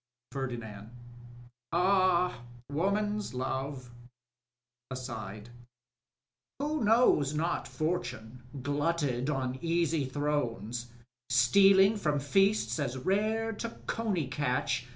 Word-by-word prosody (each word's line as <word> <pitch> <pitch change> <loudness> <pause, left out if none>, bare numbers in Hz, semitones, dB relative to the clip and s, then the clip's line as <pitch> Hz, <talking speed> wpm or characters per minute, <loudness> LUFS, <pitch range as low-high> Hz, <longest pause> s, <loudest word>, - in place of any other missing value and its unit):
Fbrdinano. 115 -6 -5 0.5
— 120 0 -23
Ah, 180 -2 +3 0.3
woman's 205 +3 0
love 130 0 -3 1.0
I 130 - -4
iAfidt) 110 -5 -6 1.1
Who 295 -1 -1
knows 210 - +4
not 165 +3 -1
Fortune, 125 -7 -3 0.2
glutted 145 -3 0
on 130 -2 -2
easy 165 -3 +1
thrones* 125 -5 -2 0.4
SteaUnfi^ 195 - +6
from 150 -6 +1
feasts 195 +6 +2
as 130 -3 -2
rare 215 - 0
to 230 +2 -4 0.2
coneycatch. 145 - -1
145 Hz, 90 wpm, -30 LUFS, 125-190 Hz, 1.1 s, SteaUnfi^